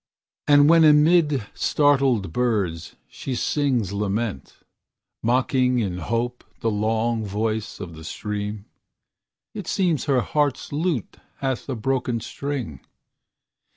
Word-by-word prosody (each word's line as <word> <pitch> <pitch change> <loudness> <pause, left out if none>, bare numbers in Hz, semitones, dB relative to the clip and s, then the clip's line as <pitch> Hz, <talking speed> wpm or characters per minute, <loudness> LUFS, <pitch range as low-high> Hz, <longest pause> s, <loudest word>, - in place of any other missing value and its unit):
And 145 0 +6
when 165 0 +6
amid 150 - +4
startled 135 - +2
birds 100 -9 -1
she 130 - -5
sings 125 -7 0
lament, 100 - -3 0.7
Mocking 125 +1 +2
in 95 -6 -1
hope 115 +6 -2 0.2
the 115 - +1
long 110 +2 0
voice 110 +1 -2
of 85 - -7
the 80 - -11
stream, 105 +3 -5 0.9
It 205 -5 -7
seems 175 -6 +1
her 135 -4 +2
heart's 145 +1 -1
lute 150 - -2 0.2
hath 135 0 -3
a 130 - -1
broken 125 0 -1
string. 125 - -5
120 Hz, 115 wpm, -23 LUFS, 105-145 Hz, 0.9 s, And